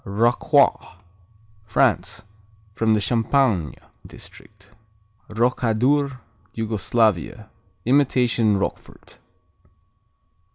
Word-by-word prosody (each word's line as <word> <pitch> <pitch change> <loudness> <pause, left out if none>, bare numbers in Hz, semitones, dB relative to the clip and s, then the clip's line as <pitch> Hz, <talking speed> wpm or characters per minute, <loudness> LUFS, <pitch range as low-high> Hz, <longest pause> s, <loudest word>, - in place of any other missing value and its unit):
Rocroi 120 - +1 0.7
France 110 0 0 0.5
From 110 +1 +1
the - - +1
Champagne 115 - 0 0.3
district. 100 -1 -15 0.6
Rokadur 125 +4 0 0.4
Yugoslavia 110 -2 -1 0.3
Imitation 125 -5 +2
Roquefort. 95 - -7
115 Hz, 55 wpm, -22 LUFS, 105-125 Hz, 0.7 s, Imitation